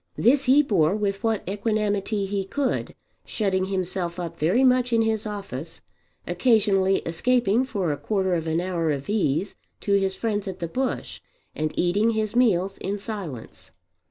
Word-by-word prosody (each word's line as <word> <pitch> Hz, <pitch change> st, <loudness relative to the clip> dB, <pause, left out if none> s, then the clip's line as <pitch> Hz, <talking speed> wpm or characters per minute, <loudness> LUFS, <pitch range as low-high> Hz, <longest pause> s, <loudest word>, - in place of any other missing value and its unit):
This 270 Hz, +4 st, +3 dB
he 275 Hz, +3 st, +6 dB
bore 190 Hz, -, +2 dB
with 200 Hz, -1 st, -2 dB
what 225 Hz, -4 st, 0 dB
equanimity 205 Hz, 0 st, -1 dB
he 195 Hz, 0 st, -2 dB
could, 270 Hz, +8 st, -2 dB, 0.3 s
shutting 190 Hz, -3 st, -1 dB
himself 185 Hz, -2 st, -2 dB
up 170 Hz, -1 st, -6 dB
very 180 Hz, -, +3 dB
much 250 Hz, -1 st, +3 dB
in 230 Hz, -1 st, +3 dB
his 220 Hz, -1 st, -1 dB
office, 175 Hz, -7 st, -6 dB, 0.4 s
occasionally 195 Hz, 0 st, +2 dB
escaping 235 Hz, +6 st, +2 dB
for 195 Hz, -, -1 dB
a 145 Hz, -, -2 dB
quarter 190 Hz, -1 st, 0 dB
of 165 Hz, -2 st, -1 dB
an 160 Hz, +1 st, +1 dB
hour 175 Hz, -3 st, -1 dB
of 140 Hz, +4 st, -2 dB
ease 190 Hz, -3 st, 0 dB, 0.3 s
to 200 Hz, -, 0 dB
his 195 Hz, -1 st, +2 dB
friends 210 Hz, -3 st, -2 dB
at 190 Hz, -1 st, -5 dB
the 170 Hz, -, -4 dB
Bush, 260 Hz, +9 st, -3 dB, 0.3 s
and 155 Hz, 0 st, -2 dB
eating 200 Hz, +6 st, +2 dB
his 215 Hz, 0 st, -1 dB
meals 195 Hz, -6 st, +2 dB
in 200 Hz, +2 st, -3 dB
silence. 195 Hz, -, -7 dB
195 Hz, 160 wpm, -24 LUFS, 175-220 Hz, 0.4 s, he